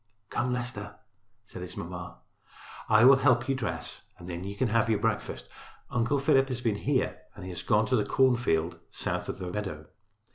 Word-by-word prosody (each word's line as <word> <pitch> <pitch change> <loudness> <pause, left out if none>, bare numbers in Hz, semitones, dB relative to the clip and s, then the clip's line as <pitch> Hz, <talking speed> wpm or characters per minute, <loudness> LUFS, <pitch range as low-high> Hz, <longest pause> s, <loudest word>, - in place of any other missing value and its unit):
"Come, 125 +1 0
Leicester," 125 0 -3 0.5
said - - -9
his - - -7
mamma, - - -6 0.7
"I 110 +1 +7
will 135 +1 +9
help 125 -3 +3
you 135 - +2
dress 135 - -3 0.2
and 85 - -11
then 85 0 -5
you 100 +1 -5
can 120 +3 +1
have 115 +1 +2
your 110 - +3
breakfast. - - -2 0.4
Uncle 120 +4 +1
Philip 135 -1 +4
has 130 -2 -3
been 115 -3 +1
here 100 - 0 0.2
and - - -9
he 90 - -6
has 90 - -5
gone 105 +1 +3
to 130 - +1
the 110 - +2
cornfield 100 - +2
south - - -3
of - - -3
the 90 -1 -5
meadow. 90 -7 -4
115 Hz, 190 wpm, -29 LUFS, 95-130 Hz, 0.7 s, will